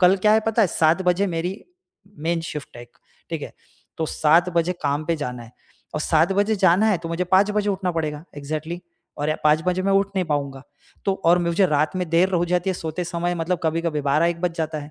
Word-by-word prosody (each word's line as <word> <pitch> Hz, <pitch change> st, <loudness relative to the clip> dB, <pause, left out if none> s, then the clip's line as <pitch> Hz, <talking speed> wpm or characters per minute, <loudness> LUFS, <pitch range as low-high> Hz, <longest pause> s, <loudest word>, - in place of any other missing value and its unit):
कल 185 Hz, +1 st, +6 dB
क्या 210 Hz, +3 st, +3 dB
है 220 Hz, -, +5 dB
पता 225 Hz, 0 st, +3 dB
है 190 Hz, -, +3 dB
7 165 Hz, +4 st, +2 dB
बजे 180 Hz, +2 st, +2 dB
मेरी 175 Hz, +3 st, -3 dB, 0.6 s
मेन 165 Hz, +2 st, -1 dB
शिफ्ट 150 Hz, -4 st, -8 dB
है 120 Hz, -, -9 dB
एक, 120 Hz, -, -18 dB, 0.3 s
ठीक -, -, -4 dB
है। -, -, -7 dB, 0.4 s
तो 160 Hz, -, -1 dB
7 165 Hz, +5 st, +3 dB
बजे 170 Hz, +1 st, +1 dB
काम 145 Hz, +2 st, 0 dB
पे 165 Hz, 0 st, 0 dB
जाना 125 Hz, -4 st, -5 dB
है 115 Hz, +1 st, -14 dB, 0.4 s
और -, -, -1 dB
7 160 Hz, +4 st, +2 dB
बजे 205 Hz, +2 st, +2 dB
जाना 185 Hz, +3 st, +4 dB
है 200 Hz, -6 st, +2 dB
तो 165 Hz, 0 st, -7 dB
मुझे 170 Hz, +2 st, -1 dB
5 190 Hz, +3 st, +3 dB
बजे 210 Hz, 0 st, 0 dB
उठना 190 Hz, -2 st, -1 dB
पड़ेगा 155 Hz, -1 st, -3 dB
एक्ज़ैक्टली 155 Hz, +4 st, -5 dB, 0.4 s
और 150 Hz, +1 st, 0 dB
5 155 Hz, +1 st, +4 dB
बजे 180 Hz, +1 st, +1 dB
मैं 195 Hz, 0 st, +1 dB
उठ 195 Hz, 0 st, +3 dB
नहीं 185 Hz, -, +1 dB
पाऊँगा। 140 Hz, -3 st, -2 dB, 0.4 s
तो 195 Hz, -, +2 dB
और 175 Hz, +1 st, +5 dB
मुझे 175 Hz, +2 st, +2 dB
रात 155 Hz, +3 st, 0 dB
में 180 Hz, -2 st, -2 dB
देर 175 Hz, +3 st, +3 dB
हो 175 Hz, -, +2 dB
जाती 180 Hz, +2 st, 0 dB
है -, -, -2 dB
सोते 165 Hz, +1 st, -4 dB
समय 175 Hz, +1 st, -2 dB
मतलब 170 Hz, +1 st, -1 dB
कभी-कभी 160 Hz, -1 st, 0 dB
12 145 Hz, +4 st, +2 dB
1 170 Hz, 0 st, -1 dB
बज 175 Hz, -2 st, -1 dB
जाता 160 Hz, -1 st, -2 dB
है। 145 Hz, +1 st, -9 dB
170 Hz, 235 wpm, -23 LUFS, 155-185 Hz, 0.6 s, कल